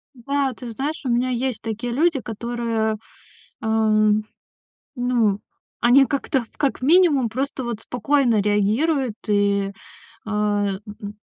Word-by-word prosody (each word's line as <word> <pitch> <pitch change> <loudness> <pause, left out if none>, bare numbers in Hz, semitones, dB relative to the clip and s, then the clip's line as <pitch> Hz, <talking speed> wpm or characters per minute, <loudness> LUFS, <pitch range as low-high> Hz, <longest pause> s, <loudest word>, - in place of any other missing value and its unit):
Да, 275 +2 -1
ты 240 0 -8
знаешь, 285 +8 -3
у - - 0
меня 245 +2 +1
есть 255 0 -2
такие 230 +2 -4
люди, 315 +2 +2
которые, 230 -1 -2 0.7
эм, 215 -1 +3 0.7
ну, 240 -5 +1 0.4
они 250 +3 +6
как-то, 270 -2 -1
как 280 -3 0
минимум 295 -4 +4
просто 265 +3 -3
вот 235 -3 -4
спокойно 245 -2 +1
реагируют, 220 +7 +1
и, 200 -1 +2 0.6
э, - - -5
м, 205 -2 0 0.2
м, 205 0 -7
235 Hz, 120 wpm, -22 LUFS, 215-265 Hz, 0.7 s, они